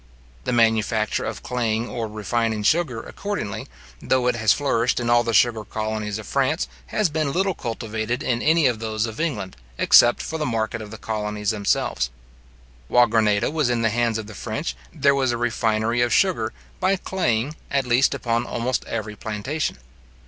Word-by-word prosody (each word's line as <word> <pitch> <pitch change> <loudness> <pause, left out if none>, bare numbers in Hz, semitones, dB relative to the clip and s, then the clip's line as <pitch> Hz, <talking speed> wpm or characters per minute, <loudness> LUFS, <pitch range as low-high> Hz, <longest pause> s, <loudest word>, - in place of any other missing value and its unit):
The - - 0
manufacture 110 -2 +2
of - - -5
claying 115 -2 -1
or 115 -3 -3
refining 110 +1 -1
sugar, 135 -3 +1
accordingly, 200 - -4 0.3
though 130 -1 +1
it 125 - +2
has 110 -3 +3
flourished 120 -3 +1
in 120 -1 0
all 120 0 +5
the 115 - -1
sugar 115 0 +3
colonies 110 -1 -3
of 110 - -8
France, 140 +5 0 0.2
has 215 -3 +1
been 155 -2 -1
little 190 +4 +1
cultivated 115 -2 -3
in 120 -1 0
any 160 0 +4
of 120 -4 +2
those 110 0 -1
of 110 -1 -7
England, 115 - -2 0.2
except 120 0 +6
for 160 - -4
the - - 0
market 115 -1 -1
of 105 - -8
the 110 - -8
colonies 105 -1 -2
themselves. 100 - 0 0.8
While 120 - +5
Grenada 105 0 +2
was 155 -5 +1
in 120 -1 0
the 115 - +2
hands 115 0 +1
of 110 - -5
the 110 - -10
French, 65 -9 -4 0.2
there 140 - +3
was 135 -3 +1
a 120 - -1
refinery 115 -1 +1
of 120 -1 +2
sugar, 170 - +2 0.3
by 190 +1 +2
claying, 150 -8 -1
at 140 -2 +1
least 125 +2 +3
upon 115 0 0
almost 120 +2 -1
every 110 -2 -4
plantation. 110 - -3
115 Hz, 180 wpm, -23 LUFS, 110-130 Hz, 0.8 s, except